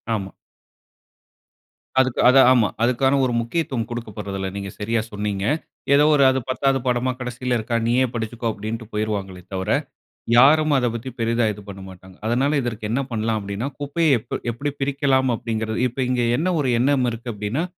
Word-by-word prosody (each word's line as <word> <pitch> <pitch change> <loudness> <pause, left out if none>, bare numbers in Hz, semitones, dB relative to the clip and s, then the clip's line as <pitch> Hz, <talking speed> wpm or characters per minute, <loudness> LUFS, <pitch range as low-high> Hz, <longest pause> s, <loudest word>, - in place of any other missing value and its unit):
ஆமா. 95 -2 -5 1.7
அதுக்கு 130 -2 +1
அது 130 +2 +6
ஆமா. 120 -5 +4 0.2
அதுக்கான 130 +3 +2
ஒரு 125 - -1
முக்கியத்துவம் 120 -1 -2
கொடுக்கப்பட்றதுல்ல. 105 -5 -5
நீங்க 100 -1 -4
சரியாக 110 +1 0
சொன்னீங்க. 105 -1 -3 0.5
ஏதோ 145 +1 +6
ஒரு 145 -2 +5
அது 130 0 +1
10 135 +1 +1
படமா 125 +1 +1
கடைசியில 125 0 -2
இருக்கிறதா 115 +1 -1
நீயே 125 +2 +3
படிச்சிக்கோ 115 0 -3
அப்டின்னு 110 +2 -5
போய்டுவாங்களே 100 -4 -3
தவிர. 95 +2 -3 0.7
யாரும் 155 +4 +6
அத 125 - +1
பத்தி 115 +3 -5
பெரியதா 115 +1 +1
இது 105 - -11
பண்ணமாட்டாங்க. 95 -1 -11
அதனால 125 +5 +1
இதற்கு 115 -3 -4
என்ன 125 +4 +1
பண்ணலாம் 110 0 0
அப்டின்னா, 100 +5 -4
குப்பைய 160 +4 0
எப் - - -11 0.2
எப்டி 140 +5 -3
பிரிக்கலாம் 135 -1 +1
அப்டிங்கிறது. 110 -1 -3
இப்ப 125 +3 -9
இங்க 125 -1 +1 0.2
என்ன 170 - 0
ஒரு 135 - +1
எண்ணம் 130 0 +2
இருக்கு 120 +1 -5
அப்டின்னா, 105 +10 -2
120 Hz, 155 wpm, -22 LUFS, 105-130 Hz, 1.7 s, அது